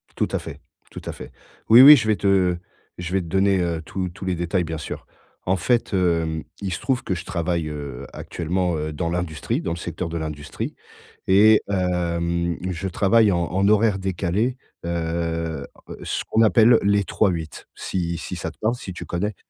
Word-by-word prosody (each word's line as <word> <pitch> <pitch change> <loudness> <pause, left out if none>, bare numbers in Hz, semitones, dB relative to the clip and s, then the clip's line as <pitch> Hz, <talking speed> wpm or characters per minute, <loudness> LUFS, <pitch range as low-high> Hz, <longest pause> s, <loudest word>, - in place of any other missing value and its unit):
Tout - - 0
à - - 0
fait, - - -9 0.3
tout - - -8
à - - -3
fait. - - -10 0.4
Oui, 120 +3 +10
oui, 150 +2 +12
je 110 -5 -1
vais 105 - +3
te 95 -3 +2 0.4
je 90 +1 -5
vais 95 - +2
te 85 - -8
donner, 95 +2 +2
heu, 85 -2 -1
tous 95 -2 -3
tous 90 - -9
les 95 -1 0
détails, 85 +1 0
bien 80 -1 -4
sûr. 75 - -7 0.4
En 95 +1 +2
fait, 115 +4 0
hem, 85 -4 +1 0.2
il 95 -3 -2
se - - -3
trouve 130 -3 0
que 95 - -2
je 85 - -6
travaille, 85 -3 -2
heu, 70 -4 -6
actuellement, 90 +1 -2
heu, 75 +1 -3
dans 85 +2 -2
l'industrie, 85 -3 -2
dans 85 - -3
le 85 - -3
secteur 85 0 -5
de 85 - -4
l'industrie 75 -2 -5 0.5
et 105 +3 +6
hem, 85 -2 -1
je 95 +2 -3
travaille 105 +3 +3
en 85 -1 +1
en 95 +3 +1
horaires 105 -2 +3
décalées, 95 +6 -1 0.3
heu, 85 -1 -2 0.4
ce - - -2
qu'on 110 - +4
appelle 115 +1 +6
les 100 0 +2
trois-huit 85 -8 -1
si 85 -2 -3
si 90 - -6
ça 85 -1 -4
te 80 - -19
parle, 110 +3 0
si 95 - -7
tu 90 - -8
connais? 100 +4 -2
90 Hz, 195 wpm, -23 LUFS, 85-100 Hz, 0.5 s, oui